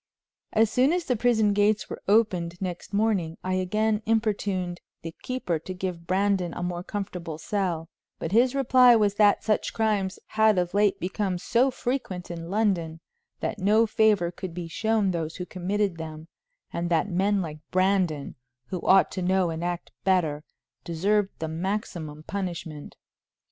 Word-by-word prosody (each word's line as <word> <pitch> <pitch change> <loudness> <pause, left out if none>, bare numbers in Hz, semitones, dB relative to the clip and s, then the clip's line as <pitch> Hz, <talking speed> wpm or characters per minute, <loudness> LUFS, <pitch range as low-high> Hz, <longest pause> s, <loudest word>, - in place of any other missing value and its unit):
As 220 0 +3
soon 255 +5 +3
as 355 -1 -1
the 250 - +1
prison 220 -3 +3
gates 205 +1 +2
were - - -7
opened 185 -5 +2
next 180 -2 -5
morning, 200 -6 0
I 185 - -1
again 210 +4 +1
importuned 200 -5 0 0.2
the 165 0 -6
keeper 255 -11 -2
to 185 +4 -7
give 180 -2 -5
Brandon 190 -2 +1
a 175 - -4
more 175 -1 -3
comfortable 180 -5 -5
cell, 175 -3 -2 0.3
but 165 - -4
his 245 +5 +4
reply 255 -2 +6
was 210 -3 +3
that 205 0 +4
such 215 -1 0
crimes 210 -3 0
had 220 -2 +3
of 180 -1 0
late 205 0 +3
become 190 0 -2
so 240 +8 +2
frequent 240 -9 -3
in 165 0 -6
London 185 -6 0 0.4
that 215 - -2
no 210 +4 +4
favor 210 -5 +2
could 180 -1 -7
be 175 -2 -5
shown 220 +2 +1
those 165 -2 -3
who 180 - -5
committed 190 +1 -1
them, 160 0 -7 0.5
and 170 0 -2
that 165 +1 +2
men 200 +2 +1
like 155 -2 -7
Brandon, 185 -6 +1 0.4
who 185 - -3
ought 190 0 +5
to 185 - -4
know 185 -1 +2
and 160 +1 -4
act 175 0 -3
better, 160 -6 +1 0.4
deserved 195 +5 +1
the 160 - -3
maximum 160 -3 -4
punishment. 170 -6 -5
190 Hz, 160 wpm, -26 LUFS, 175-210 Hz, 0.5 s, reply